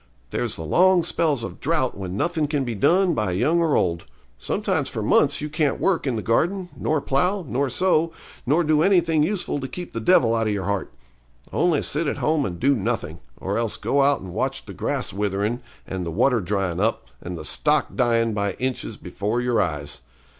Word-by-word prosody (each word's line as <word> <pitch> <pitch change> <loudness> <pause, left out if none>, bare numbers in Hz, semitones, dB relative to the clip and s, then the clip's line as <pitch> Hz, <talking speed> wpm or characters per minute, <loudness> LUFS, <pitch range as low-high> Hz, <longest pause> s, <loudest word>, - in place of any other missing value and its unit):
There's - - -1
the 80 - -6
long 180 - +4
spells 155 -6 0
of - - -7
drought 150 -4 0
when 95 -1 -5
nothing 160 +2 0
can 145 -2 0
be 120 -2 -3
done 175 - +3
by 105 - -1
young 145 - +2
or 160 -3 +2
old. 85 -1 0 0.3
Sometimes - - -1
for - - -4
months 140 0 +3
you 150 - -2
can't 150 -2 0
work 180 -6 +1
in 130 - 0
the 110 - -3
garden, 175 - 0
nor 155 -1 0
plough, 180 +9 0
nor 135 +2 0
sow, 165 +3 +2 0.3
nor 150 +7 +2
do 155 -1 +3
anything 165 -4 +3
useful 180 -2 -1
to 135 - -4
keep 175 +7 -8
the 115 - -2
devil 115 -3 +4
out 115 -1 +1
of 105 - +1
your 100 -2 -2
heart. 100 -1 -2 0.6
Only 170 -5 +2
sit 155 +2 -1
at - - -1
home 150 -3 +1
and 85 -2 -6
do 140 +3 +3
nothing, 115 -1 -2 0.2
or 100 +4 -2
else 115 -2 -2
go 140 - +1
out 140 +1 +3
and 90 -2 -8
watch - - -2
the - - -9
grass - - -2
witherin' 105 +4 -1 0.2
and 95 -1 -4
the 85 - -3
water 120 +8 +2
dryin' 95 -2 -1
up, 110 +3 0
and 90 0 -6
the 75 - -7
stock 150 - +1
dyin' 115 -3 +2
by 100 -1 -1
inches 130 0 -3
before 105 +4 -3
your 120 -1 +1
eyes. 75 -4 -3
130 Hz, 205 wpm, -23 LUFS, 105-155 Hz, 0.6 s, long